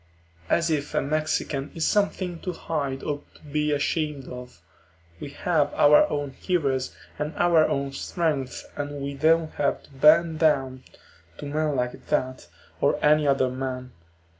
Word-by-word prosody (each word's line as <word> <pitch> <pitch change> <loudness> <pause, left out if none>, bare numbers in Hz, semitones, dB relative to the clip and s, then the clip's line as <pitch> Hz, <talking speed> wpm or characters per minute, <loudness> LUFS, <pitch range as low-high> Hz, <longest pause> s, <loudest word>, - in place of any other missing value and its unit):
As 170 -1 +2
if 150 -2 -2
a - - +3
Mexican 150 -1 -1
is 165 - 0
something 185 -4 0
to 180 - -4
hide 140 -5 -3
or 145 -1 -3
to - - -19
be 150 0 -1
ashamed 145 -1 -1
of. 125 -5 -9 0.6
We 140 - -6
have 150 +1 0
our 150 +1 +6
own 145 -2 -2
heroes 135 -5 -1 0.2
and 150 +2 -3
our 170 -3 +4
own 140 0 -1
strength 145 -4 -2
and 145 0 -4
we 140 0 -3
don't 160 +3 +2
have 140 - 0
to - - -20
bend 155 +4 +4
down 135 -5 +1 0.5
to - - -7
men 150 0 -1
like 125 -1 -3
that, 130 0 -1 0.3
or - - +3
any 150 0 +4
other 135 -2 +2
men. 130 -1 -5
145 Hz, 155 wpm, -25 LUFS, 135-155 Hz, 0.6 s, our